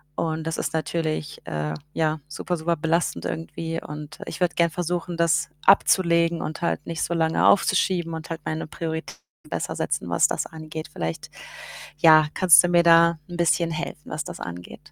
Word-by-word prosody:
Und 160 -1 -2
das 165 0 -2
ist 145 - -3
natürlich, 155 -1 -3
äh, 75 0 -3 0.2
ja, 155 -1 0
super, 165 +4 -3
super 170 +2 0
belastend 165 +2 -1
irgendwie 165 0 -4
und 150 0 -9
ich - - -6
würde 175 -1 +1
gern 170 0 +3
versuchen, 175 +1 -3
das 165 -1 +2 0.2
abzulegen 170 -3 +4
und 155 +3 -5
halt 170 -3 -1
nicht 165 -1 -4
so 170 - -1
lange 160 -1 +2
aufzuschieben 180 -3 +2
und 160 0 -7
halt 165 -1 -5
meine 155 0 -3
Prioritäten 160 0 -5 0.3
besser - - -3
setzen, - - -2
was - - +4
das - - -2
angeht. 155 0 -8
Vielleicht, 80 0 -5 0.7
ja, 155 -1 +6
kannst 175 -4 +7
du 175 - +2
mir 175 -1 +4
da 170 0 +6
'n 175 - -6
bisschen 170 0 +2
helfen, 155 -1 -6
was 155 +1 -3
das - - -8
angeht? 90 0 -9
165 Hz, 175 wpm, -24 LUFS, 155-170 Hz, 0.7 s, kannst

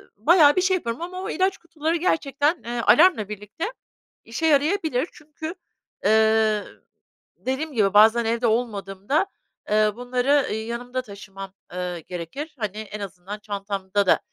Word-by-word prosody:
bayağı 290 - +6
bir 370 - +3
şey 375 0 +3
yapıyorum 235 -4 -4
ama 365 +2 -5
o - - -4
ilaç 380 +3 +1
kutuları 330 -1 -2
gerçekten, 315 -2 0
eee, 240 0 -3
alarmla 230 - +5
birlikte 210 - -5 0.5
işe 235 +8 -3
yarayabilir. 310 -1 +2
Çünkü, 310 +3 -8 0.5
eee, 220 0 +4 0.7
dediğim 275 +4 -3
gibi, 205 -5 +2
bazen 220 +3 +6
evde 235 +2 +1
olmadığımda, 220 - 0 0.4
eee, 215 0 +3
bunları, 250 +2 -1
ııı, - - -3
yanımda 235 +3 -4
taşımam, 195 -3 -10 0.2
eee, 180 -1 -3
gerekir. 180 - -7
Hani, 210 -2 -3
en 215 -1 -6
azından 200 +1 -7
çantamda 200 -1 -2
da - - +4
235 Hz, 140 wpm, -24 LUFS, 205-305 Hz, 0.7 s, bayağı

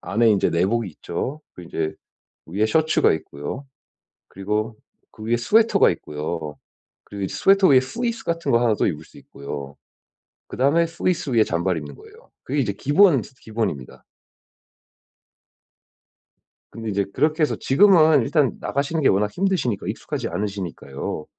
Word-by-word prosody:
안에 115 +1 +2
이제 100 - +2
내복이 100 +5 0
있죠. 110 - -5
그리고 90 -2 -11
이제 80 -2 -3 0.5
위에 100 +6 0
셔츠가 155 +7 +3
있고요. 75 - -6 0.6
그리고 105 +3 -3 0.4
그 - - -13
위에 115 +2 +1
스웨터가 220 - +4
있고요. 75 0 -5 0.5
그리고 100 -2 -5
스웨터 195 -1 +4
위에 135 -2 +7
후리스 235 - -3
같은 170 0 -2
거 115 - +4
하나 120 -2 +3
또 - - 0
입을 80 -1 -3
수 - - -20
있고요. 70 0 -8 0.7
그다음에 145 +6 +2
후리스 165 -2 -2
위에 115 -3 +4
잠바를 85 -1 -1
입는 70 -1 -9
거예요. - - -17
그게 140 +3 -1
이제 110 -6 0
기본 145 - +4
중의 130 - -14
기본입니다. 105 - -4 2.7
근데 115 -1 -6
이제 100 -1 0
그렇게 155 +1 +1
해서 - - 0
지금은 160 -2 +5
일단 140 +3 +1
나가시는 145 +3 -1
게 - - +4
워낙 105 +2 +2
힘드시니까 175 - -1
익숙하지 - - -4
않으시니까요. 90 -8 -5
115 Hz, 350 characters per minute, -22 LUFS, 90-155 Hz, 2.7 s, 위에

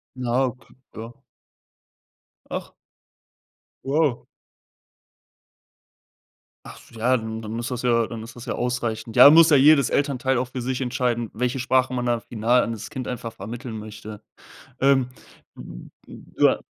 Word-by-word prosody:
Na, 125 0 0
okay, 125 0 -8 0.2
ja. 115 +2 -10 1.3
Ach. - - -5 1.1
Ja. 140 -2 0 2.4
Ach, - - -11
so, 115 - -15
ja, 125 +3 +2
dann 110 -1 -6
dann 110 +1 -6
ist 120 +2 -4
das 125 - -3
ja 115 -2 +2
dann 115 0 -7
ist 115 +1 -11
das 120 0 -10
ja 120 - -3
ausreichend. 120 -2 -3
Ja, 125 +3 +10
muss 165 +1 +7
ja 150 - +6
jedes 140 -1 +5
Elternteil 135 -2 0
auch 125 0 -2
für 125 0 -5
sich 130 +1 -3
entscheiden, 120 -2 -1
welche 125 +3 -2
Sprache 130 +1 +1
man 125 -1 -2
da 120 -1 0
final 120 +3 +1
an - - -2
das 110 -1 -8
Kind 130 -1 -6
einfach 115 -2 -6
vermitteln 115 +3 -7
möchte. 105 0 -10 0.6
Ähm, 135 -2 +3 0.5
u - - -11 0.5
u - - +6
ah - - 0
120 Hz, 150 wpm, -23 LUFS, 115-130 Hz, 2.4 s, Ja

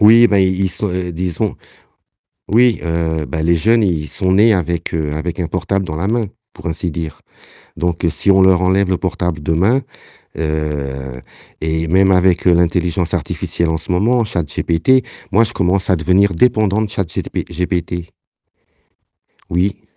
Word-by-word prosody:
Oui, 115 +3 +7
ben 100 -3 +2
ils 95 0 +2
ils - - +1
sont, 105 - -3 0.2
disons 90 0 -2 1.0
oui, 120 +1 +4
heu, 80 -1 -1
ben 80 -2 -3
les 85 +1 +3
jeunes, 115 +7 +3
ils 80 -6 0
sont 95 -2 -1
nés 105 +4 +5
avec, 85 -3 -1
heu, 75 -2 -2
avec 85 +3 -4
un 85 - -1
portable 90 +3 -2
dans 75 - -5
la 85 +5 -2
main, 115 0 0 0.3
pour - - -11
ainsi 85 +1 -2
dire. 80 -2 -6 0.6
Donc, 85 -1 -2
heu, 85 - +3
si 100 - +1
on 95 - +5
leur 95 -1 +5
enlève 95 +1 +2
le 95 - +1
portable 90 -4 -3
demain, 95 - +2 0.6
heu 70 -5 -3 0.4
et 80 +1 -1
même 95 +3 +4
avec, 90 -1 +2
heu, 90 - +6
l'intelligence 85 0 0
artificielle 85 -1 -2
en 80 - -1
ce 80 - -10
moment, 115 +7 +2
ChatGPT, 85 - +1 0.3
moi 115 +4 +5
je 115 - -5
commence 95 +1 0
à 95 - +3
devenir 90 +4 +2
dépendant 110 0 +2
de 105 - -3
ChatGP 95 -6 -3
GPT. 90 -1 -3 1.4
Oui. 90 +3 0
90 Hz, 165 wpm, -17 LUFS, 80-100 Hz, 1.4 s, Oui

